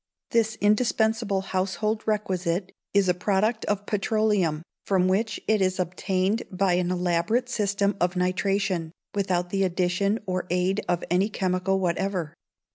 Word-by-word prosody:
This 225 Hz, -1 st, +2 dB
indispensable 220 Hz, -1 st, +2 dB
household 195 Hz, +3 st, -1 dB
requisite 185 Hz, -3 st, -1 dB, 0.2 s
is 200 Hz, -2 st, +3 dB
a 180 Hz, -, +4 dB
product 205 Hz, +5 st, 0 dB
of 205 Hz, 0 st, -1 dB
petroleum, 205 Hz, -7 st, +1 dB, 0.2 s
from 185 Hz, -2 st, +2 dB
which 210 Hz, +3 st, 0 dB
it 215 Hz, -1 st, +3 dB
is 185 Hz, 0 st, +1 dB
obtained 185 Hz, +4 st, 0 dB
by 190 Hz, -1 st, +1 dB
an 175 Hz, 0 st, +1 dB
elaborate 180 Hz, +7 st, 0 dB
system 200 Hz, -3 st, 0 dB
of 175 Hz, +1 st, +1 dB
nitration, 185 Hz, -1 st, 0 dB, 0.2 s
without 180 Hz, -3 st, 0 dB
the 195 Hz, 0 st, +1 dB
addition 185 Hz, +3 st, +1 dB
or 185 Hz, -1 st, -2 dB
aid 180 Hz, +4 st, +1 dB
of 175 Hz, -1 st, +1 dB
any 190 Hz, +4 st, +3 dB
chemical 190 Hz, -1 st, 0 dB
whatever. 180 Hz, -2 st, -1 dB
190 Hz, 135 wpm, -26 LUFS, 180-210 Hz, 0.2 s, a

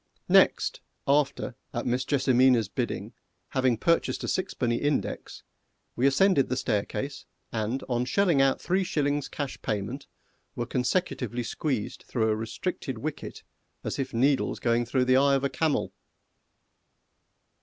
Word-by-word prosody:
Next, -, -, +4 dB, 0.3 s
after, 140 Hz, -2 st, +1 dB, 0.2 s
at 120 Hz, -, -2 dB
Miss 125 Hz, +1 st, +1 dB
JESSIMINA'S 130 Hz, -5 st, +3 dB
bidding, -, -, -3 dB, 0.4 s
having 130 Hz, -3 st, +2 dB
purchased 165 Hz, +8 st, +1 dB
a -, -, -2 dB
sixpenny 125 Hz, -11 st, -1 dB
index, 145 Hz, -1 st, -2 dB, 0.5 s
we 130 Hz, +3 st, +3 dB
ascended 140 Hz, +1 st, +3 dB
the 130 Hz, -, -1 dB
staircase, 130 Hz, +5 st, -2 dB, 0.2 s
and 115 Hz, +4 st, -2 dB
on 125 Hz, -1 st, 0 dB
shelling 170 Hz, 0 st, +3 dB
out 135 Hz, -1 st, +3 dB
three 190 Hz, +2 st, +1 dB
shillings 145 Hz, -4 st, 0 dB
cash 140 Hz, -2 st, -5 dB
payment, 115 Hz, +5 st, -3 dB, 0.5 s
were 120 Hz, -, -2 dB
consecutively 125 Hz, -, -1 dB
squeezed 130 Hz, -3 st, -3 dB
through 110 Hz, -3 st, +1 dB
a 110 Hz, -, +2 dB
restricted 120 Hz, +4 st, -4 dB
wicket 150 Hz, +7 st, -6 dB, 0.4 s
as -, -, -3 dB
if 135 Hz, -, -2 dB
needles 135 Hz, +4 st, +1 dB
going 120 Hz, 0 st, +1 dB
through 125 Hz, +1 st, +1 dB
the 130 Hz, 0 st, +4 dB
eye 140 Hz, +1 st, +4 dB
of 135 Hz, -, 0 dB
a 140 Hz, -, +1 dB
camel. 160 Hz, 0 st, 0 dB
130 Hz, 135 wpm, -27 LUFS, 120-145 Hz, 0.5 s, Next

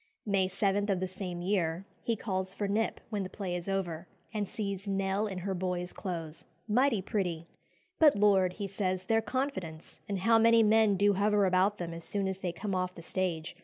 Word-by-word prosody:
May 195 Hz, -3 st, +2 dB
7 200 Hz, +1 st, 0 dB
of 190 Hz, -2 st, +2 dB
the 185 Hz, -, -1 dB
same 180 Hz, -2 st, -5 dB
year, 180 Hz, -2 st, 0 dB, 0.2 s
he 230 Hz, -, 0 dB
calls 190 Hz, -2 st, -3 dB
for 205 Hz, -, -1 dB
Knipp 215 Hz, +3 st, 0 dB
when 210 Hz, -2 st, -1 dB
the 185 Hz, -, -4 dB
play 185 Hz, -4 st, -4 dB
is 175 Hz, +2 st, -4 dB
over, 175 Hz, -3 st, -2 dB, 0.3 s
and 210 Hz, -3 st, -2 dB
sees 200 Hz, -2 st, -4 dB
"Nell 195 Hz, +1 st, 0 dB
in 190 Hz, -3 st, -5 dB
her 195 Hz, -, 0 dB
boy's 180 Hz, -1 st, -3 dB
clothes, 165 Hz, -5 st, -5 dB, 0.2 s
mighty 235 Hz, -2 st, +2 dB
pretty." 180 Hz, -6 st, -2 dB, 0.5 s
"But, 305 Hz, -3 st, +7 dB
Lord!" 195 Hz, -3 st, +4 dB
he 200 Hz, +1 st, -4 dB
says, 185 Hz, -1 st, -2 dB
"their 225 Hz, +2 st, +3 dB
confidence! 220 Hz, -, -4 dB
and 195 Hz, -2 st, -2 dB
how 225 Hz, +2 st, +5 dB
many 230 Hz, 0 st, +6 dB
men 215 Hz, -1 st, +4 dB
do 205 Hz, +2 st, +4 dB
hover 205 Hz, +1 st, +3 dB
about 190 Hz, +3 st, +3 dB
them 170 Hz, -1 st, -4 dB
as 165 Hz, 0 st, -7 dB
soon 200 Hz, +1 st, -1 dB
as 190 Hz, 0 st, -3 dB
they 180 Hz, -2 st, -2 dB
come 195 Hz, +4 st, -4 dB
off 185 Hz, 0 st, -1 dB
the 170 Hz, -, -9 dB
stage! 170 Hz, -3 st, -2 dB
195 Hz, 200 wpm, -31 LUFS, 180-210 Hz, 0.5 s, But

